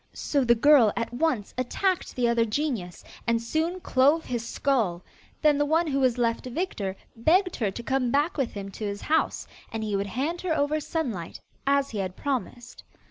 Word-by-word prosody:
So 280 Hz, -2 st, 0 dB
the 235 Hz, -1 st, +4 dB
girl 250 Hz, -3 st, +6 dB
at 230 Hz, 0 st, -2 dB
once 245 Hz, -6 st, 0 dB
attacked 365 Hz, +9 st, -1 dB
the 245 Hz, -2 st, +2 dB
other 235 Hz, 0 st, +3 dB
genius, 225 Hz, -, -2 dB, 0.2 s
and 230 Hz, 0 st, +3 dB
soon 320 Hz, +10 st, -1 dB
clove 290 Hz, +1 st, +3 dB
his 240 Hz, -2 st, -3 dB
skull; 230 Hz, -8 st, 0 dB, 0.4 s
then 295 Hz, -2 st, +4 dB
the 290 Hz, -, +3 dB
one 325 Hz, +3 st, +3 dB
who 275 Hz, -3 st, 0 dB
was 255 Hz, -2 st, +2 dB
left 230 Hz, +1 st, 0 dB
victor 240 Hz, -, -3 dB, 0.2 s
begged 355 Hz, -, +3 dB
her 215 Hz, -4 st, 0 dB
to 235 Hz, +5 st, -7 dB
come 260 Hz, 0 st, 0 dB
back 290 Hz, +6 st, +1 dB
with 270 Hz, -5 st, -1 dB
him 200 Hz, -1 st, -6 dB
to 215 Hz, -, -8 dB
his 205 Hz, -1 st, -3 dB
house 320 Hz, +1 st, 0 dB, 0.3 s
and 225 Hz, -1 st, -3 dB
he 210 Hz, -2 st, -1 dB
would 200 Hz, +1 st, -1 dB
hand 290 Hz, -, -2 dB
her 340 Hz, -4 st, 0 dB
over 290 Hz, +2 st, +1 dB
Sunlight, 255 Hz, -, -4 dB, 0.3 s
as 280 Hz, 0 st, +2 dB
he 215 Hz, -, -3 dB
had 185 Hz, -1 st, -3 dB
promised. 250 Hz, -3 st, -4 dB
255 Hz, 190 wpm, -26 LUFS, 225-300 Hz, 0.4 s, girl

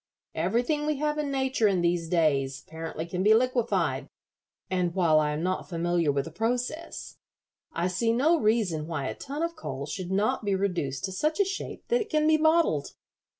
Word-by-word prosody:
Everything 240 Hz, -, 0 dB
we 305 Hz, -, +1 dB
have 300 Hz, +1 st, -1 dB
in 295 Hz, -1 st, -1 dB
nature 265 Hz, -5 st, +1 dB
in 190 Hz, -3 st, +2 dB
these 170 Hz, -1 st, 0 dB
days 140 Hz, -5 st, +1 dB
apparently 160 Hz, 0 st, -6 dB
can 180 Hz, +2 st, -3 dB
be 215 Hz, +3 st, +6 dB
liquefied, 245 Hz, 0 st, +1 dB, 0.6 s
and 180 Hz, -2 st, -1 dB
while 165 Hz, -5 st, +4 dB
I 150 Hz, -1 st, +1 dB
am 150 Hz, +2 st, -2 dB
not 185 Hz, +1 st, -2 dB
familiar 170 Hz, -2 st, +1 dB
with 140 Hz, 0 st, -1 dB
the 165 Hz, -, -8 dB
process, 245 Hz, -, -3 dB, 0.5 s
I 170 Hz, -, -1 dB
see 225 Hz, +6 st, +1 dB
no 305 Hz, +8 st, +3 dB
reason 210 Hz, -, +1 dB
why 155 Hz, -5 st, -3 dB
a -, -, -2 dB
ton 285 Hz, +3 st, -5 dB
of 335 Hz, 0 st, -2 dB
coal 140 Hz, -, -5 dB
should 180 Hz, +4 st, -5 dB
not 215 Hz, +6 st, +1 dB
be 200 Hz, -2 st, +1 dB
reduced 175 Hz, -9 st, -2 dB
to 190 Hz, -, -5 dB
such 305 Hz, -, -1 dB
a 400 Hz, -, +5 dB
shape 390 Hz, +1 st, -6 dB
that 480 Hz, 0 st, +3 dB
it 435 Hz, -, -5 dB
can 305 Hz, -1 st, +2 dB
be 315 Hz, 0 st, +5 dB
bottled. 315 Hz, -, +2 dB
195 Hz, 195 wpm, -27 LUFS, 165-275 Hz, 0.6 s, be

